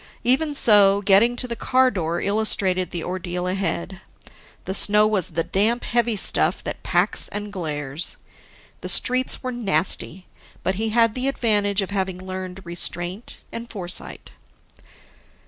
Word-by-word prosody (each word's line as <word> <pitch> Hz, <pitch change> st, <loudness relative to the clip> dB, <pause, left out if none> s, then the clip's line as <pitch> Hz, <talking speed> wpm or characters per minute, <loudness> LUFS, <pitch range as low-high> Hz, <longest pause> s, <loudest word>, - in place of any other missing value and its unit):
Even 290 Hz, +5 st, +1 dB
so, 205 Hz, -4 st, +5 dB
getting 210 Hz, +5 st, +4 dB
to 250 Hz, +1 st, -1 dB
the 235 Hz, -, -5 dB
car 255 Hz, +2 st, +2 dB
door 170 Hz, -4 st, -3 dB
illustrated 195 Hz, -3 st, +1 dB
the 170 Hz, -2 st, -5 dB
ordeal 180 Hz, -1 st, -4 dB
ahead; 190 Hz, 0 st, -3 dB, 0.6 s
the 190 Hz, -, -4 dB
snow 210 Hz, +2 st, +7 dB
was 210 Hz, -5 st, +1 dB
the 165 Hz, 0 st, -2 dB
damp, 220 Hz, +7 st, 0 dB
heavy 235 Hz, -1 st, 0 dB
stuff 195 Hz, -, +2 dB
that -, -, -6 dB
packs -, -, 0 dB
and 205 Hz, 0 st, -7 dB
glares. 150 Hz, -3 st, -5 dB, 0.6 s
The -, -, -5 dB
streets 255 Hz, +2 st, +4 dB
were 255 Hz, -, -3 dB
nasty, 190 Hz, -4 st, -1 dB, 0.4 s
but 190 Hz, -, 0 dB
he 225 Hz, -, -1 dB
had 230 Hz, 0 st, +2 dB
the 255 Hz, +2 st, -2 dB
advantage 205 Hz, -6 st, 0 dB
of 195 Hz, -, -7 dB
having 190 Hz, -2 st, -2 dB
learned 185 Hz, 0 st, -7 dB
restraint 175 Hz, +4 st, -4 dB
and 230 Hz, +1 st, -8 dB
foresight. 180 Hz, -4 st, -5 dB
200 Hz, 145 wpm, -22 LUFS, 180-230 Hz, 0.6 s, snow